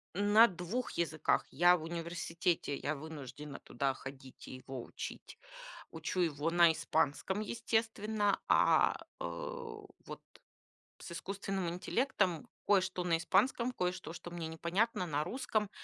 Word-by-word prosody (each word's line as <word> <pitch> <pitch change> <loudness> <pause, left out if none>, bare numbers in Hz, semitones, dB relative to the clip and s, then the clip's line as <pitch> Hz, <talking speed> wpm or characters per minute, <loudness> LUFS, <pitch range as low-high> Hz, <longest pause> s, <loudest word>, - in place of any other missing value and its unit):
На 205 +4 +7
2 185 +7 -3
языках. 155 -2 +1
Я 175 +5 +6
в 165 - -5
университете, 170 -1 -1
я 155 - -2
вынуждена 150 -1 -8
туда 135 -1 -1
ходить 135 -1 -10
и - - -7
его 130 -1 -7
учить. - - -8 0.5
Учу 185 - -3
его 160 -2 +1
на 170 -1 +6
испанском, 160 +5 0
естественно, 220 -2 0
а, - - +5 0.3
э, - - -4
вот - - -8 0.8
с - - -9
искусственным 195 0 -3
интеллектом 180 - 0 0.2
кое-что 190 -2 +3
на 170 -2 +2
испанском, 240 +8 +2
кое-что, 180 -6 -3
что 175 0 -8
мне 170 -2 -4
непонятно, 180 +6 0
на 150 -2 0
русском, 220 - -1
175 Hz, 125 wpm, -34 LUFS, 160-205 Hz, 0.8 s, На